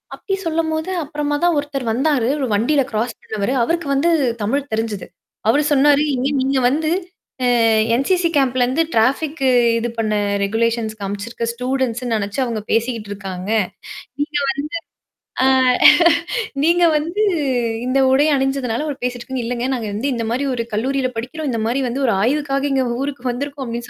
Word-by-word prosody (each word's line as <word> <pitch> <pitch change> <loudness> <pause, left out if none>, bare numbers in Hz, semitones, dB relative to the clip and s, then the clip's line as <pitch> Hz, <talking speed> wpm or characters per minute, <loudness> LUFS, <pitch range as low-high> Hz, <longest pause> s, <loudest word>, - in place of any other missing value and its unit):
அப்படி 390 - -3
சொல்லும்போது, 320 0 -1
அப்பறமா 295 0 -2
தான் 350 -1 +3
ஒருத்தர் 280 -4 -2
வந்தாரு. 260 0 +1
ஒரு 265 - -1
வண்டியில 275 +7 +2
கிராஸ் 225 +2 -2
பண்ணவரு. 215 +3 -2
அவருக்கு 335 +4 -1
வந்து 280 +5 +2 0.3
தமிழ் 275 +7 -1
தெரிஞ்சது. 220 -3 -2 0.4
அவரு 285 +6 +4
சொன்னாரு, 290 +1 +5
"இங்க 255 +1 0
நீங்க 265 +1 +1
வந்து, 310 +4 0 0.5
ஆ, - - +2 0.5
NCC 365 +6 +1
கேம்ப்ல 255 -2 +2
இருந்து 265 +7 +1
டராஃபிக்கு 275 +5 +1 0.3
இது 235 +1 -2
பண்ண 215 -1 0 0.3
ரெகுலேஷன்ஸ் 225 +1 -1
காமிச்சிருக்க 205 +4 -4
ஸ்டூடண்ட்ஸ்ன்னு 250 -1 -1
நினைச்சு 205 +4 -4
அவங்க 230 -3 -3
பேசிக்கிட்டு 230 -2 -1
இருக்காங்க. 195 -1 -6 0.7
நீங்க 295 +1 -1 0.8
வந்து, - - -69
ஆ, - - +5 1.2
நீங்க 345 +2 +3
வந்து 340 +8 -1 0.6
இந்த 260 +2 +2
உடை 280 +3 +4
அணிஞ்சதுனால 270 -1 -1
அவர் 285 -2 -5
பேசிட்டுருக்காங்க." 250 +1 -3
"இல்லங்க, 245 +1 -2
நாங்க 225 -4 -4
வந்து 250 +7 -1
இந்த 230 -2 -2
மாரி 260 +4 -1
ஒரு 230 -1 -2
கல்லூரியில 260 +4 0
படிக்கிறோம். 285 +6 -4
இந்த 230 -2 -2
மாரி 250 +4 0
வந்து 260 +4 -3
ஒரு 230 - +3
ஆய்வுக்காக 275 +3 0
எங்க 265 -1 +1 0.2
ஊருக்கு 275 -3 -5
வந்திருக்கோம்" 280 +2 -5
அப்படின்னு 235 0 -5
260 Hz, 150 wpm, -19 LUFS, 230-290 Hz, 1.2 s, சொன்னாரு